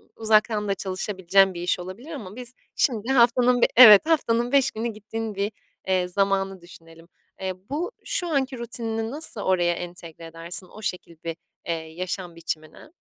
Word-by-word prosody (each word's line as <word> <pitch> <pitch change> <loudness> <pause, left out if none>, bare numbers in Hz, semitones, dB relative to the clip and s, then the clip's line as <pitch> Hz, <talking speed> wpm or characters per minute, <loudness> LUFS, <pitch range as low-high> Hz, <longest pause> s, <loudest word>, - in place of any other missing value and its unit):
uzaktan 215 -1 +2
da 200 - 0
çalışabileceğin 190 0 +1
bir 175 - -6
iş 180 +1 0
olabilir 185 - -9
ama 215 - -8
biz 250 0 -5 0.2
şimdi 230 -5 +1
haftanın 245 0 +4
bi - - +7
evet 215 -3 +10
haftanın 245 -7 +1
5 275 -1 +3
günü 225 +2 -3
gittiğin 220 0 -5
bir, 200 +2 -1 0.4
eee, 185 -1 +1
zamanı 195 0 0
düşünelim. 165 -1 -16 0.3
Eee, 190 0 -2 0.2
bu 330 +10 -2
şu 375 -8 -2
anki 270 -4 -1
rutinini 225 -1 -3
nasıl 285 -7 -2
oraya 175 -2 +2
entegre 170 -2 -8
edersin, 165 +3 -4
o 215 - -13
şekil 180 -4 -5
bir, 165 -1 -4 0.3
eee, 170 - -1
yaşam 170 +2 -5
biçimine? 160 - -6
200 Hz, 160 wpm, -24 LUFS, 180-235 Hz, 0.4 s, evet